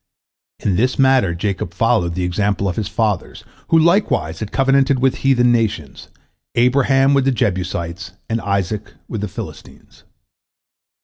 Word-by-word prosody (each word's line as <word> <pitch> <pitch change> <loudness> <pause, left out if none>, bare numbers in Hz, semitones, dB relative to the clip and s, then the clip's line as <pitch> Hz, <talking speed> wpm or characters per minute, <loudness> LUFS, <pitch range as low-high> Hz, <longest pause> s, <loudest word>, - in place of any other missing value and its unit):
In 95 -3 -1
this 125 +5 +1
matter 130 -10 +3
Jacob 95 +1 -3
followed 85 -1 +1
the 90 - -2
example 100 +2 -1
of 90 - -2
his 105 - -2
fathers, 110 -5 -2 0.2
who 165 - +3
likewise 160 - +2
had 105 - -5
covenanted 135 0 +2
with 130 0 +1
heathen 125 -3 +3
nations, 110 - -2 0.5
Abraham 135 +2 +3
with 135 -1 +2
the 135 - +3
Jebusites, 90 -6 -3
and 115 0 -2
Isaac 100 +1 -3
with 110 - -5
the 105 - -2
Philistines. 95 - -11
110 Hz, 140 wpm, -18 LUFS, 95-135 Hz, 0.5 s, matter